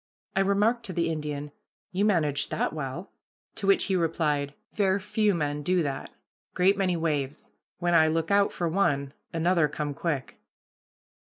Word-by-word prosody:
I - - +2
remarked 205 +5 +2
to 190 - -4
the 170 -1 0
Indian, 150 -2 -4 0.4
"You 195 +3 +1
managed 155 -9 +1
that - - -1
well," 155 +4 -5 0.4
to 195 - -4
which 195 - +5
he 190 - 0
replied: 150 -4 0 0.2
"Ver' 195 -2 +2
few 205 +1 +1
men 150 -2 -1
do 180 +3 +2
that. 140 -2 -4 0.5
Great 190 +2 +4
many 185 -3 +1
waves; 150 -4 -2 0.3
when 175 0 0
I 160 -1 +6
look 165 +2 0
out 200 0 +4
for 175 - -2
one, 145 -6 +1 0.2
another 165 -1 +2
come 145 0 -3
quick." 145 -3 -3
165 Hz, 160 wpm, -27 LUFS, 150-190 Hz, 0.5 s, I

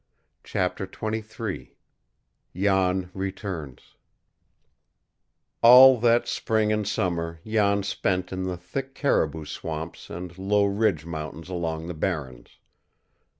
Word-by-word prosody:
CHAPTER - - -2
XXIII 110 -1 -5 0.8
JAN 95 -1 +1
RETURNS 95 - -5 1.8
All 125 +1 +9
that 120 +1 +3
spring 110 -1 +1
and 105 -1 -1
summer 85 -5 -2
Jan 100 -2 +2
spent 95 -1 -1
in 95 - -3
the 90 -1 -3
thick 135 +10 -6
caribou 80 - 0
swamps 80 +2 -6
and 90 0 -7
low 100 +1 +2
ridge 100 -6 +1
mountains 80 +1 -6
along 80 -3 -3
the 90 - -5
Barrens. 75 -7 -4
95 Hz, 105 wpm, -25 LUFS, 85-105 Hz, 1.8 s, All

